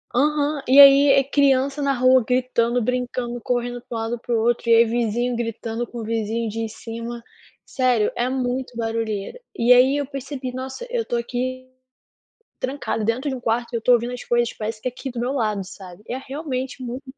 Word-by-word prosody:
Aham, 295 +1 +1
e 270 +2 +6
aí 280 0 +9
é 275 0 +5
criança 275 0 +2
na 275 -1 +2
rua 255 -1 +4
gritando, 245 -1 +1
brincando, 245 0 -2
correndo 245 0 -2
pra 235 - -6
um 225 - -2
lado, 230 +1 -3
para 240 - -4
o 225 - +2
outro, 235 +1 0
e 230 - +7
aí 230 - +7
vizinho 240 +1 -1
gritando 230 0 -3
com 240 0 -9
o 225 - -4
vizinho 225 +1 -2
de 225 +1 -3
cima. 230 +2 -7 0.4
Sério, 250 -5 +1
é 240 - 0
muito 255 -1 -2
barulheira. 225 - -3 0.2
E 235 +1 +2
aí, 255 +3 +6
eu 285 - -1
percebi: 275 -2 -6
"Nossa, 260 - -6
eu 475 -1 -1
estou 240 - -2
aqui, 255 +2 -4 0.9
trancada 260 -5 -2
dentro 255 +6 -1
de 265 - -2
um - - -7
quarto 235 +1 -1
e - - -1
eu 230 - 0
estou 245 +2 +4
ouvindo 240 +1 +1
as 250 - -7
coisas 240 -1 +1
parece 215 0 -5
que - - -3
aqui 255 +2 -7
do 240 - -6
meu 245 +3 -1
lado", 215 -6 -1
sabe? 185 0 -12
É 245 - -2
realmente 265 -2 -5
muito 250 +2 -6
245 Hz, 205 wpm, -22 LUFS, 230-260 Hz, 0.9 s, aí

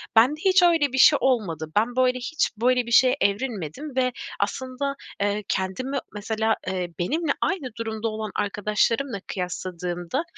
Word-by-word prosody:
bende 255 +7 +5
hiç 375 -1 +5
öyle 325 -6 +3
bir - - -1
şey 290 +2 +7
olmadı. 170 - 0
Ben 230 +4 +2
böyle 255 0 +3
hiç 275 +6 0
böyle 250 +2 +2
bir 235 - -7
şeye 255 +2 +6
evrilmedim 215 - -2
ve 255 -1 +2 0.3
aslında, 260 +2 -2 0.3
eee, 205 +1 0
kendimi 195 +9 -2 0.2
mesela, 220 +2 0
eee, 185 -1 -2
benimle 300 - 0
aynı 330 -9 -1
durumda 225 -1 -3
olan 215 -1 -4
arkadaşlarımla 210 +4 0
kıyasladığımda, 180 - -3
230 Hz, 145 wpm, -24 LUFS, 200-265 Hz, 0.3 s, şey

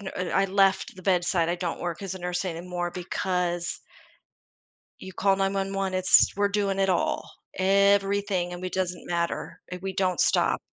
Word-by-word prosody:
n 200 - -10
and 180 -1 -3
I 195 - +3
left 195 0 +2
the 185 - -12
bedside; 175 -2 +1
I 175 - 0
don't 175 -1 -4
work 175 -1 -4
as 195 -2 -5
a 190 - -9
nurse 180 +2 -2
anymore 175 0 -4
because 180 -1 -2 1.2
you 190 - -9
call 195 +1 +2
9-1-1, 195 0 -1
it's 185 0 +5
we're 205 0 +2
doing 200 -1 0
it 195 - +2
all. 185 - 0 0.3
Everything, 195 -1 +2
and 175 0 -7
we 185 - -3
doesn't 180 -2 -3
matter, 170 -1 -3
and 180 0 -7
we 195 0 -3
don't 185 -2 0
stop. - - +2
185 Hz, 175 wpm, -26 LUFS, 175-195 Hz, 1.2 s, it's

